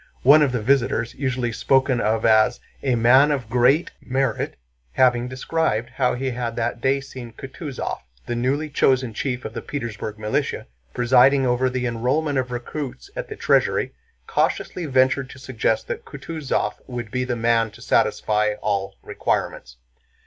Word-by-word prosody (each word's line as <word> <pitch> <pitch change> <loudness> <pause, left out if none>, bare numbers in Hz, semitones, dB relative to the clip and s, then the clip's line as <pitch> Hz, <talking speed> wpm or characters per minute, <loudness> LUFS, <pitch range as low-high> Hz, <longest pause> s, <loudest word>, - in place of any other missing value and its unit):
One 145 +4 +7
of 145 -3 +3
the 125 -4 -2
visitors, 120 -2 +1
usually 130 -3 -2
spoken 130 +1 +2
of 110 +1 +1
as 110 -1 +4 0.2
"a 130 -3 +1
man 130 +5 +5
of 130 -7 -2
great 125 +7 +3
merit," 135 +1 -1 0.4
having 125 -1 +3
described 130 -2 -1
how 125 -2 +1
he 130 +1 -2
had 120 -1 -3
that 115 0 -2
day 135 +2 +2
seen 130 -4 -9
Kutúzov, 135 +2 -6 0.3
the - - -3
newly 135 +6 0
chosen 130 -4 +2
chief 125 +2 -3
of - - -5
the - - -5
Petersburg 110 -6 -5
militia, 105 0 -2 0.3
presiding 130 +3 +5
over 125 +1 +2
the 125 0 -2
enrollment 130 +5 0
of 130 -1 -2
recruits 135 - -6
at - - -4
the 430 - -6
Treasury, - - +1 0.3
cautiously 175 -3 -1
ventured 130 0 +2
to 130 - -11
suggest 115 -4 -1
that - - -4
Kutúzov 150 +1 -3
would 120 -4 -6
be 125 +1 -1
the 125 -1 -2
man 115 -1 +2
to - - -16
satisfy 105 0 +1
all 100 -2 -2
requirements. - - -2
125 Hz, 155 wpm, -22 LUFS, 115-135 Hz, 0.4 s, One